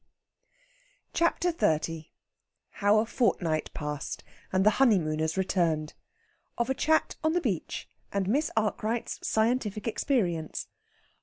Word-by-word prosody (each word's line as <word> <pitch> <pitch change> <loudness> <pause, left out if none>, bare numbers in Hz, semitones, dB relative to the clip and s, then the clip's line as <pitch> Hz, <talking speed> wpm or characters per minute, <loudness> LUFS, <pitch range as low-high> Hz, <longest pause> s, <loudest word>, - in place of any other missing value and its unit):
CHAPTER 340 +1 +2
XXX 160 - 0 0.6
HOW 205 +1 +3
A 215 - +3
FORTNIGHT 175 - 0
PASSED, 150 -1 -4 0.3
AND 190 +1 +2
THE 215 - +7
HONEYMOONERS 160 -9 +3
RETURNED. 165 -5 +1 0.6
OF 235 +1 0
A - - +3
CHAT 315 +4 +1
ON 315 0 +2
THE 355 - +2
BEACH, - - -2 0.2
AND 200 -2 0
MISS 290 +9 +2
ARKWRIGHT'S 220 +2 -1
SCIENTIFIC 220 -2 0
EXPERIENCE. 185 - 0
205 Hz, 110 wpm, -29 LUFS, 160-240 Hz, 0.6 s, THE